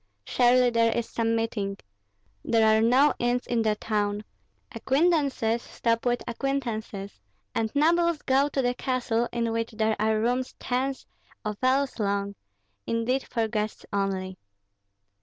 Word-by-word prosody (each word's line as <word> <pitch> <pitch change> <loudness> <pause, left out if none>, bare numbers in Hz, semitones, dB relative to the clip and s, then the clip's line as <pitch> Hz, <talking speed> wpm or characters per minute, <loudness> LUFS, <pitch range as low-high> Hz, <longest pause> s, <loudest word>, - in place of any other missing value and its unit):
Surely 250 0 +4
there 230 -1 +3
is 235 - -1
some 230 0 0
meeting. 210 -3 -2 0.7
There 225 -1 +3
are 220 0 +5
no 255 +6 +4
inns 245 +1 0
in 235 -1 0
the 215 -1 +1
town; 210 -1 -1 0.5
acquaintances 275 -6 +1
stop 230 0 -1
with 245 0 0
acquaintances, 230 - -3 0.3
and 220 -1 -1
nobles 335 +2 +2
go 275 +2 +3
to 270 -2 -1
the 245 0 +1
castle, 240 -2 -1
in 230 -1 -1
which 230 0 -2
there 220 0 +1
are 215 0 +2
rooms 250 +3 -1
tens 260 +2 -2 0.4
of 210 -1 -3
ells 265 0 +1
long, 200 -1 -1 0.5
intended 235 +4 0
for 230 -2 0
guests 215 -1 -3
only. 190 -2 -2
230 Hz, 140 wpm, -26 LUFS, 220-255 Hz, 0.7 s, are